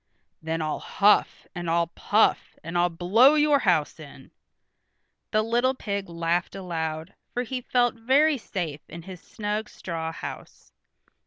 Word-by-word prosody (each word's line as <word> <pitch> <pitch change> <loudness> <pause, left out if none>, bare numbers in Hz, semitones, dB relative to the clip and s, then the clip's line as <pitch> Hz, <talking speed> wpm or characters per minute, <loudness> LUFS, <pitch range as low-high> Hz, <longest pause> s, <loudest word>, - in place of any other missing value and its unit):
"Then 160 0 -2
I'll 155 -1 -2
huff, 205 +1 +2
and 175 -2 -4
I'll 170 +1 +2
puff, 205 +6 +1
and 165 +2 -7
I'll 175 0 +3
blow 205 - +4
your 295 -1 +4
house - - +1
in." - - -13 1.0
The 215 0 +2
little 240 +4 +1
pig 200 -6 -4
laughed 170 +2 -1
aloud, 160 -4 -4 0.2
for 245 - 0
he 250 +1 -4
felt 245 0 +1
very 270 +5 +3
safe 165 -9 -5
in 170 +1 -9
his 185 -1 -10
snug 210 0 -4
straw 165 -2 -5
house. - - -9
190 Hz, 145 wpm, -25 LUFS, 165-235 Hz, 1.0 s, blow